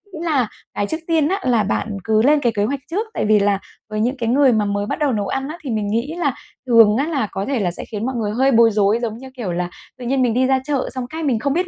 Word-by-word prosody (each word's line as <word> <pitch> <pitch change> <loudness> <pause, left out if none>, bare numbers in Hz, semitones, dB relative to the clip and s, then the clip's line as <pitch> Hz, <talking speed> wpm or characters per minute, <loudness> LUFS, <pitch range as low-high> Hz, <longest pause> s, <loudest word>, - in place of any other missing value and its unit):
Nghĩ 315 - -6
là 280 -8 +2 0.3
cái 205 - -1
trước 315 - -2
tiên 320 -3 +2
á, 385 +4 0
là 240 -4 +2
bạn 205 +1 -2
cứ 220 +1 +2
lên 290 +5 +4
cái 240 -4 +1
kế 205 - +1
hoạch 275 +5 -2
trước. 415 +6 -1
Tại - - -1
vì 210 0 +4
là 200 -1 +2 0.3
với 215 0 -3
những 250 +5 0
cái 230 -2 -1
người 270 +1 +5
mà 215 -1 +1
mới 205 0 -1
bắt - - -3
đầu 295 -3 +2
nấu 205 -4 -1
ăn 270 +6 -2
á, 320 - -6
thì 275 - -5
mình 215 -3 -1
nghĩ 235 +9 -1
là 290 -7 0 0.3
thường 225 -3 +6
á, 280 +4 0
là 280 -10 -1
có 195 +1 -3
thể 270 -3 -1
là 180 -4 0
sẽ - - -7
khiến 215 0 -5
mọi 260 0 -2
người 215 -3 -1
hơi 265 +4 +2
bối 230 -2 +5
rối, 205 +1 +2
giống 225 -2 -3
như 265 +2 -10
kiểu 215 -7 -3
là, 175 0 -2 0.3
tự 250 - -8
nhiên 265 +2 +1
mình 245 -3 +2
đi 255 +2 +2
ra 265 0 +3
chợ 285 -2 -1
xong 255 -1 -4
cái 320 +2 -5
mình 260 -7 +1
không 280 +4 0
biết 360 +3 0
240 Hz, 310 wpm, -20 LUFS, 215-275 Hz, 0.3 s, thường